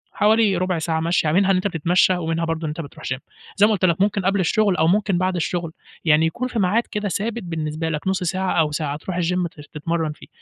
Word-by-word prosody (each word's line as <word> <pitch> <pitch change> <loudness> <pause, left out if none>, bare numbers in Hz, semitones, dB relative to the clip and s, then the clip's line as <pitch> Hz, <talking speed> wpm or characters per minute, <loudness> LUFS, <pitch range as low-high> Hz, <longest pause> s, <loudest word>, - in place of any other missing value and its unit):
حوالي 215 -2 +3
رُبع 180 -1 0
ساعة 160 0 -1
مشي 165 -1 +1
منها، 195 +2 +4
أنت 185 +1 +2
بتتمشّى 180 +1 +2
ومنها 165 -1 -1
برضه 165 0 -2
أنت 155 +2 -4
بتروح 145 - -11
gym - - -5 0.4
زي 205 - +6
ما - - +1
قُلت 195 -2 +1
لك، 170 0 +2
ممكن 200 -1 +1
قبْل 195 +1 +2
الشغل 200 +2 +2
أو 160 -2 +2
ممكن 195 +1 +2
بَعد 185 +1 0
الشغل، 170 -1 -2 0.3
يعني 160 0 +4
يكون 245 +10 -2
في 240 -3 -3
ميعاد 205 +5 +2
كده 210 -1 -2
ثابت 225 +5 -2
بالنسبة 160 -1 -3
لك، 155 +2 -3
نُص 190 -1 0
ساعة 185 +2 -1
أو 155 -2 +2
ساعة 150 -1 -2
ترُوح 180 +3 -5
الgym 180 +1 0
ت 150 - -13
تتمرّن 160 +1 -2
فيه. 150 - -13
175 Hz, 230 wpm, -22 LUFS, 160-195 Hz, 0.4 s, زي